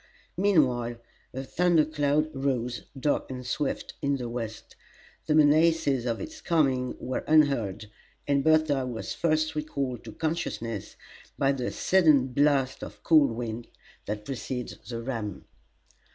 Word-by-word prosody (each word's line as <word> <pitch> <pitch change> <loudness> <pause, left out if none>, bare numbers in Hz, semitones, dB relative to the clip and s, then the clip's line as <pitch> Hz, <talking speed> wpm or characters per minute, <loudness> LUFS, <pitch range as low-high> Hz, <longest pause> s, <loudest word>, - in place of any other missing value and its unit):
Meanwhile 135 -12 +2 0.4
a 130 - -5
thunder 170 +2 +3
cloud 150 0 0
rose, 125 -3 -2
dark 145 +2 0
and 125 -1 -6
swift, 135 +3 -2
in 140 0 +1
the 125 -2 -4
west. 115 -2 -6 0.5
The 155 - +3
menaces 150 -4 +4
of 115 -1 -1
its 315 0 -8
coming 135 -7 +1
were 130 - -3
unheard, 135 -11 +3 0.4
and 140 -1 +2
Bertha 155 -4 +3
was 120 -3 -4
first 155 -1 +1
recalled 140 -5 -3
to 110 - -8
consciousness 155 - -3 0.4
by 135 0 +3
the 130 -3 -2
sudden 155 -8 +3
blast 135 0 +2
of - - -10
cold 155 -4 +5
wind 115 0 -5 0.4
that 105 +1 -4
precedes 130 -2 -4
the 115 -1 -4
ram. 115 -6 -4
135 Hz, 135 wpm, -27 LUFS, 120-155 Hz, 0.5 s, cold